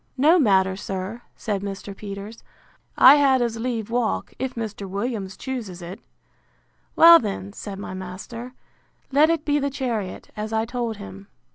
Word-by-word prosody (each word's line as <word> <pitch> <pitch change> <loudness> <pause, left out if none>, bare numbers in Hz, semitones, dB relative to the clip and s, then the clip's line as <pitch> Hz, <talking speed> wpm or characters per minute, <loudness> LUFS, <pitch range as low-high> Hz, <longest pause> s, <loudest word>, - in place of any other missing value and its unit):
No 315 +7 +5
matter, 190 -7 +3
sir, 195 +4 -5
said 205 -3 -3
Mr. 200 0 -6
Peters: 200 +2 -8 0.5
I 275 +3 +9
had 270 -2 +4
as 235 -2 -1
lieve 230 -2 -3
walk, 240 -2 -1
if 260 -1 -3
Mr. 210 -4 -5
Williams 200 -1 -3
chooses 230 -9 -5
it. 180 +4 -8 1.0
Well 335 0 +9
then, 200 -2 -5
said 200 -2 -7
my 195 - -6
master, 210 +7 -8 0.6
let 295 +4 +5
it 330 -2 0
be 295 0 +2
the 280 0 0
chariot, 235 -8 -4
as 215 +1 -4
I 220 0 +1
told 235 -2 -3
him. 95 0 -10
220 Hz, 155 wpm, -23 LUFS, 195-255 Hz, 1.0 s, I